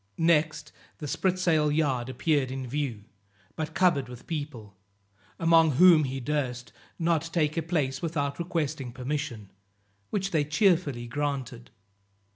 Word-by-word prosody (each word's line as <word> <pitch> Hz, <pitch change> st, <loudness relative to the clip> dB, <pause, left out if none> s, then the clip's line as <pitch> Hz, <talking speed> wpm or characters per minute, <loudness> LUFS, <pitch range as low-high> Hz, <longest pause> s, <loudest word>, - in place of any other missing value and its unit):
Next 155 Hz, -2 st, +1 dB, 0.3 s
the 150 Hz, -, -7 dB
spritsail 175 Hz, -3 st, +1 dB
yard 135 Hz, -5 st, 0 dB
appeared 140 Hz, -1 st, +1 dB
in 130 Hz, 0 st, -4 dB
view, 125 Hz, -5 st, -3 dB, 0.5 s
but 160 Hz, 0 st, -4 dB
covered 160 Hz, -9 st, +2 dB
with 125 Hz, -1 st, -11 dB
people, 145 Hz, -, -6 dB, 0.6 s
among 165 Hz, -2 st, +5 dB
whom 165 Hz, +1 st, +7 dB
he 135 Hz, 0 st, -4 dB
durst 125 Hz, -3 st, -3 dB, 0.2 s
not 165 Hz, -1 st, 0 dB
take 155 Hz, -3 st, +1 dB
a 165 Hz, -, 0 dB
place 145 Hz, -5 st, -1 dB
without 145 Hz, -4 st, -2 dB
requesting 155 Hz, -7 st, -2 dB
permission, 130 Hz, -5 st, -4 dB, 0.6 s
which 195 Hz, -1 st, -2 dB
they 155 Hz, -3 st, +2 dB
cheerfully 150 Hz, -, +1 dB
granted. 130 Hz, -2 st, -4 dB
150 Hz, 125 wpm, -27 LUFS, 130-165 Hz, 0.6 s, whom